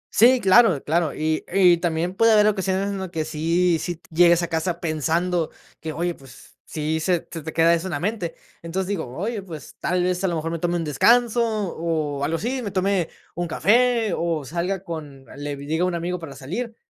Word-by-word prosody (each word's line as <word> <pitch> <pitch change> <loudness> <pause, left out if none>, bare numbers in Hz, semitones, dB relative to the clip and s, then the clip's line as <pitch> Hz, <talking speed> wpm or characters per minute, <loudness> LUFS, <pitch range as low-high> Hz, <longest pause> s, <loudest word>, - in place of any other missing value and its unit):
Sí, 250 +3 +6
claro 190 - +5
claro, 160 0 +1
y 155 0 -1
y 180 -2 +5
también, 170 +1 -1
puede 225 +3 +4
haber 210 -1 +5
ocasiones 195 -1 0
en 195 - -4
lo 190 -2 -5
que 160 -3 -3
sí 165 +2 +1
sí 175 +1 -3
t 165 - -24
llegues 170 +1 +5
a 170 - -1
casa 165 +1 -2
pensando 165 +2 0 0.3
que 160 - -4
oye, 170 +3 -2
pues, 135 -5 -16
sí 155 +1 -2
se 175 +1 0
se 165 - -6
te 160 +1 -6
queda 165 +1 +4
eso 170 +3 -1
en - - -5
la 145 - -2
mente, 180 -3 -3 0.3
entonces 180 +3 -3
digo: 185 -10 -2
"Oye, 210 +4 -3
pues, 165 -7 -10
tal 180 0 0
vez, 180 +1 -1
a - - +3
lo 175 - -1
mejor 160 +1 -3
me 165 - -3
tome 175 +1 0
un 170 - -1
descanso", 235 - +3
o 165 -9 -2
algo 165 +3 0
así, 255 +5 -2
me 205 - -4
tome 190 -2 0 0.2
un 175 0 -3
café, 230 +3 +2
o 165 -4 -2
salga 175 +6 -2
con 150 -6 -8
le 145 0 -5
diga 155 +5 -2
un 180 -1 0
amigo 175 +1 -3
para 145 -5 -9
salir, 205 - -5
170 Hz, 215 wpm, -23 LUFS, 160-190 Hz, 0.3 s, Sí